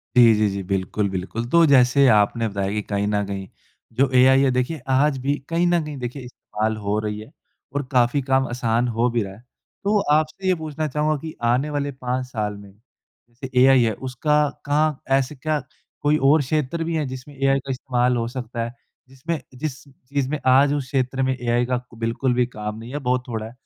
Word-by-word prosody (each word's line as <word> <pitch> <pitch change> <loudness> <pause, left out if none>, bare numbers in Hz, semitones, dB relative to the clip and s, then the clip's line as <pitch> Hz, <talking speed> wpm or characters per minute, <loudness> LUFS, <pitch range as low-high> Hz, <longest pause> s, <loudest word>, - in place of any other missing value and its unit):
जी, 120 -2 +7
जी, 105 0 +2
जी। 100 0 -4
बिल्कुल, 95 +2 -1
बिल्कुल। 95 +5 -4
तो 170 +2 +5
जैसे 135 -1 +5
आपने 110 +2 +3
बताया 100 -1 -2
कि 105 0 -1
कहीं 100 0 -2
न 105 -1 0
कहीं 95 -1 -5 0.5
जो 135 -1 +3
एआई 130 +1 +6
है 135 -1 +3
देखिए 125 +5 -1
आज 135 +2 +3
भी 140 +2 +1
कहीं 170 +1 +2
न 175 -2 +2
कहीं 150 -2 -6
देखिए 125 +2 -5
इस्तेमाल 110 -3 -3
हो 105 0 -1
रही 105 -1 -3
है, 110 +7 -11 0.4
और 145 - 0
काफ़ी 125 +2 +3
काम 130 0 +1
आसान 120 0 0
हो 120 +1 +1
भी 115 -2 0
रहा 95 0 -8
है। 110 +5 -16 0.4
तो 205 +1 +2
आपसे 155 +5 0
ये 185 - +4
पूछना 155 -1 -4
चाहूँगा 150 +2 0
कि 160 -1 -7
आने 125 +5 +2
वाले 145 -1 -2
5 130 -1 -3
साल 105 -4 -3
में 100 -1 -13 0.6
जैसे 125 +3 -9
एआई 130 -2 +6
है 110 -2 +1 0.2
उसका 150 +3 +1 0.2
कहाँ 150 0 +1 0.2
ऐसे 135 +2 -2
क्या 155 +2 -1 0.4
कोई 150 +1 +3
और 145 +3 +5
क्षेत्र 155 +3 -1
भी 165 0 -2
है 155 -2 0
जिसमें 130 +2 -9
एआई 135 0 +2
का 135 0 -6
इस्तेमाल 125 -1 0
हो 115 -1 -1
सकता 120 -1 -4
है? 120 +1 -5 0.4
जिसमें 150 +5 -4 0.2
जिस 140 0 -4
चीज़ 135 0 -4
में 150 0 -2
आज 140 +3 +5
उस 140 -3 -2
क्षेत्र 135 0 -1
में 130 0 +1
एआई 120 0 0
का 125 0 -1 0.2
बिल्कुल 115 +3 0
भी 125 0 +2
काम 105 -3 -6
नहीं 115 +2 -9
है 145 - -2
बहुत 125 -1 0
थोड़ा 110 -3 -4
है, 110 - -9
130 Hz, 210 wpm, -22 LUFS, 115-145 Hz, 0.6 s, जी